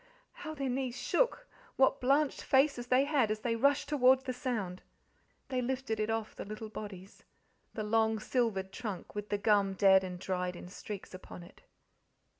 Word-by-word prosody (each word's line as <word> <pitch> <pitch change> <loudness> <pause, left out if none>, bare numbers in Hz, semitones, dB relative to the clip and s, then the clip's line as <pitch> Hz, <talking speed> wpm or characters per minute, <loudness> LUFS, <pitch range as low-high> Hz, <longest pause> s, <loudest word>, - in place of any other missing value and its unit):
How 310 0 -8
their 275 -2 -2
knees 255 -1 -2
shook - - 0 0.3
what 270 0 +3
blanched 275 +3 +2
faces 265 -3 +2
they 255 +2 +4
had 280 -7 +2
as 215 0 -2
they 230 0 0
rushed 280 +4 +2
towards 265 -2 +4
the 255 - -3
sound! 220 -8 -3 0.7
They 255 -1 0
lifted 250 -3 -2
it 215 +1 0
off 225 -1 -2
the - - -6
little 215 +1 -7
bodies 200 -3 -9 0.5
the 215 - -2
long, 220 +1 +2
silvered 215 -4 -1
trunk 210 -4 -6
with 210 0 -5
the 205 - 0
gum 200 -2 +2
dead 190 -1 +6
and 180 -1 -5
dried 180 -1 -2
in 175 - -9
streaks 200 +1 -8
upon 185 -1 -10
it. 175 - -16
225 Hz, 175 wpm, -32 LUFS, 200-260 Hz, 0.7 s, dead